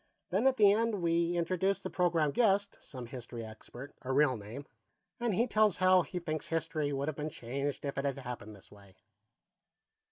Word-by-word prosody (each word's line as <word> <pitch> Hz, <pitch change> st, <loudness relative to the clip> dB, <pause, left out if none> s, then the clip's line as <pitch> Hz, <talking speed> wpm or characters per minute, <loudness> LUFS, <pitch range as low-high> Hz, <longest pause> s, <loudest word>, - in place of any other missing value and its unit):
Then, 205 Hz, +8 st, +3 dB
at 265 Hz, 0 st, +3 dB
the 205 Hz, -2 st, +7 dB
end, 215 Hz, -3 st, +1 dB
we 170 Hz, +1 st, +2 dB
introduce 185 Hz, +3 st, +1 dB
the -, -, -6 dB
program 170 Hz, -4 st, +2 dB
guest, 200 Hz, 0 st, +2 dB
some 130 Hz, -3 st, -8 dB
history 120 Hz, -1 st, -7 dB
expert, 120 Hz, +5 st, -10 dB
a 130 Hz, -, -4 dB
real 135 Hz, -1 st, +4 dB
name, 110 Hz, +6 st, -8 dB, 0.5 s
and 235 Hz, -5 st, 0 dB
he 235 Hz, -, +3 dB
tells 215 Hz, -4 st, +3 dB
how 185 Hz, 0 st, +5 dB
he 180 Hz, -, -6 dB
thinks 155 Hz, -3 st, -3 dB
history 160 Hz, -2 st, -1 dB
would 140 Hz, +1 st, -2 dB
have 155 Hz, -, -1 dB
been 150 Hz, 0 st, -3 dB
changed 140 Hz, 0 st, -4 dB
if 140 Hz, -1 st, -2 dB
it 140 Hz, -, -2 dB
had 140 Hz, -1 st, -1 dB
happened 120 Hz, -5 st, -7 dB
this 100 Hz, -, -17 dB
way." 100 Hz, -2 st, -17 dB
155 Hz, 190 wpm, -32 LUFS, 130-190 Hz, 0.5 s, the